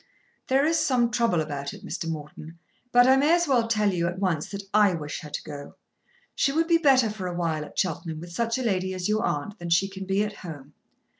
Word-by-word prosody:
"There 270 +1 +3
is 325 +1 +2
some 240 -3 +2
trouble 220 -7 +2
about 145 -2 -5
it, - - -12
Mr. 165 - -4
Morton; 155 +1 -7 0.3
but 245 0 +6
I 265 +1 +6
may 295 +5 +4
as 345 -1 +1
well 245 -4 +2
tell 210 -3 +2
you 170 -1 0
at 175 +1 -4
once 180 -6 -1
that 200 0 -6
I 205 -3 +5
wish 150 -2 -5
her 150 - -9
to - - -5
go. 145 -2 -9 0.6
She 275 - +1
would 325 +3 +1
be 335 -1 +4
better 260 -8 +4
for 200 -4 -5
awhile 170 -3 -2
at - - -12
Cheltenham 165 -2 -2
with 170 +1 -9
such 230 +5 -1
a 260 - -2
lady 190 -4 0
as 180 -1 -2
your 215 +1 +1
aunt 205 +7 -2
than 170 0 -5
she 175 +3 +3
can 195 0 -8
be 195 +2 +2
at 210 -1 -5
home. 150 -5 -9
195 Hz, 235 wpm, -26 LUFS, 165-235 Hz, 0.6 s, but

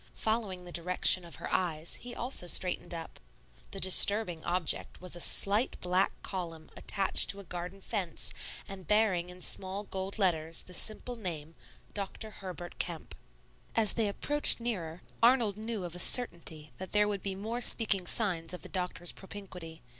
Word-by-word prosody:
Following 210 -5 -2
the 175 - -9
direction 180 +1 +4
of 170 - -9
her - - -6
eyes, 165 -3 -1
he 245 0 -7
also 240 -7 -3
straightened 180 +1 +4
up. 165 -1 -5 0.5
The 195 - -6
disturbing 190 -2 +5
object 175 -1 0
was 180 -1 -8
a 175 - -6
slight 205 +9 +2
black 180 +2 +1
column 165 -4 -6
attached 195 -1 +1
to 200 - 0
a - - -9
garden 180 +2 -7
fence 190 -6 -2 0.3
and 190 -2 -9
bearing 205 -5 +2
in 180 0 -9
small 190 +2 -1
gold 195 0 -4
letters 165 -5 +1
the 180 - -12
simple 220 +6 -2
name, 165 -7 -5 0.4
Dr. 210 +2 -4
Herbert 180 -3 -8
Kemp. 165 - -4 0.6
As 220 -2 +3
they 225 -3 +1
approached 290 +9 +4
nearer, 180 -8 -4 0.2
Arnold 230 -4 +4
knew 220 -1 -4
of 175 -1 -6
a 180 - -6
certainty 170 -9 +4
that 190 0 -8
there 210 0 +4
would 200 -2 -2
be 195 -1 -3
more 225 +5 -4
speaking 200 -7 +2
signs 180 -6 -1
of - - -11
the - - -8
doctor's 180 -2 -2
propinquity. 180 -6 -10
185 Hz, 165 wpm, -31 LUFS, 175-210 Hz, 0.6 s, disturbing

